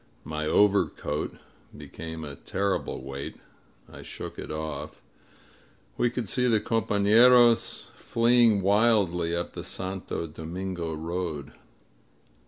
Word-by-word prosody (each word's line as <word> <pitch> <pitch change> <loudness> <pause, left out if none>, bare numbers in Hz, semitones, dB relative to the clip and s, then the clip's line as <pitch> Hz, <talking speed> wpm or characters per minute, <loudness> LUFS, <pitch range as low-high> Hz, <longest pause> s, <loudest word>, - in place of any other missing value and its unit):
My 75 0 -4
overcoat 100 -6 +1 0.4
became 80 0 -8
a 70 -2 -7
terrible 100 -5 -2
weight. 70 +1 -6 0.5
I - - -12
shook - - -8
it - - -6
off. 75 -2 -5 1.0
We 120 - +2
could 120 -2 -4
see 125 +5 0
the 115 -3 +3
compafleros 115 +3 +4
fleeing 115 -3 +3
wildly 100 -5 +3
up 85 - -3
the - - -6
Santo 95 -2 -4
Domingo 85 +1 -5
road. 80 -3 -4
95 Hz, 105 wpm, -27 LUFS, 80-110 Hz, 1.0 s, compafleros